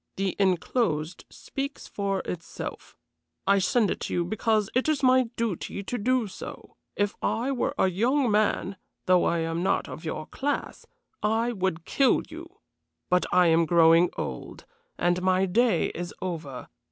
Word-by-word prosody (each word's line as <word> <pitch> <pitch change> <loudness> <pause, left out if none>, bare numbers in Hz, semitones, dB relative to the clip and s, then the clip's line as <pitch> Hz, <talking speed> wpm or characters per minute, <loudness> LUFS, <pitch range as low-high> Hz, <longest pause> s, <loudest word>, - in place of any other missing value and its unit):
The 195 -1 -1
enclosed 180 -3 0
speaks 275 +1 -6
for 195 -1 -2
itself. 170 -2 -7 0.5
I 200 +1 +4
send 210 +1 +2
it - - -3
to - - -4
you 175 - +1
because 215 +1 +1
it 255 +5 +1
is 300 -3 0
my 255 -2 +4
duty 205 -3 -3
to 245 - -3
do 255 +2 +1
so. 195 - -9 0.2
If 205 0 0
I 245 +5 0
were 260 - -1
a - - +3
young 240 +7 +1
man, 205 -2 +1 0.3
though 180 -1 +4
I 170 -1 +1
am 165 +1 -2
not 190 +2 +1
of - - -8
your 155 -1 -4
class, 285 - -4 0.3
I 225 +3 +1
would 185 -6 -2
kill 270 -2 +3
you. 335 +2 -9 0.6
But 180 0 +3
I 180 0 +5
am 165 0 +3
growing 165 +1 +5
old, - - -6 0.3
and 175 +1 +1
my 185 +1 +2
day 215 0 +2
is 175 +1 -6
over. 160 -8 -5
195 Hz, 160 wpm, -26 LUFS, 175-235 Hz, 0.6 s, I